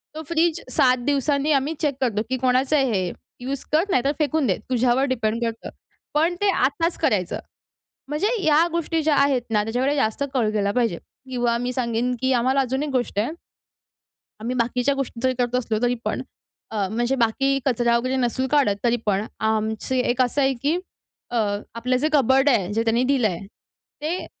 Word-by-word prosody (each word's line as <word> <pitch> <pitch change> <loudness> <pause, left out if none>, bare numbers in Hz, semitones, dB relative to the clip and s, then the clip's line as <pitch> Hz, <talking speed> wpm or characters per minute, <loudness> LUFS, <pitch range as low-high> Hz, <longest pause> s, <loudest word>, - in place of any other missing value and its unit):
तो 315 - -5
फ्रिज 335 0 +1
7 255 -4 +4
दिवसांनी 285 +1 +1
आम्ही 285 +2 +1
चेक 290 -3 +1
करतो, 220 -5 +1
की 260 - 0
कोणाचं 260 +3 +2
आहे 275 -2 +3
हे? 185 -4 0 0.3
यूज 265 +2 -4
कर, 315 +3 +4
नाहीतर 275 -4 +2
फेकून 300 -1 +1
दे, 190 - +1
तुझ्यावर 250 +1 +2
डिपेंड 225 -1 -1
करतं. 230 -1 -4 0.4
पण 325 +4 +2
ते 410 - +3
आत्ताच 330 +6 +1
करायचं. 185 -4 0 0.7
म्हणजे 300 +9 0
या 315 +2 +4
गोष्टी 330 -1 -1
ज्या 300 -2 +3
आहेत 275 -2 +3
ना, 210 -2 +2
त्याच्याकडे 250 +6 0
जास्त 245 -1 0
कळ 230 -5 +2
गेला 200 -1 0
पाहिजे 230 -7 0 0.3
किंवा 240 -2 0
मी 245 +1 -2
सांगेन, 240 0 -1
की 260 0 +2
आम्हाला 260 +3 +2
अजून 265 +2 -1
एक 300 - -3
गोष्ट 245 -5 -1
आहे. 230 +9 0 1.1
आम्ही 240 +4 -3
बाकीच्या 250 +3 +1
गोष्टी 275 -3 -4
जरी 260 0 +3
करत 245 0 0
असलो 230 -3 0
तरीपण, 245 -1 -1 0.5
अ, 205 -3 -1
म्हणजे 240 +4 0
बाकी 270 +4 +1
कचरा 240 -2 +2
वगैरे 255 +2 -1
नसून 260 +1 0
काढत 270 -8 +3
तरीपण, 220 -4 +1 0.2
आमची 220 +4 -1
एक 250 +1 +2
असं 255 +3 +1
आहे, 270 0 +3
की 285 +8 -1 0.5
अ, - - +1 0.4
आपलं 250 +2 0
जे 295 +4 +1
कबोर्ड 270 0 +4
आहे, 210 -8 +2
जे 225 +1 +1
त्यांनी 230 +2 +2
दिलं 255 -6 +3
आहे, 180 0 -5 0.6
ते 325 +5 -2
255 Hz, 180 wpm, -23 LUFS, 230-280 Hz, 1.1 s, 7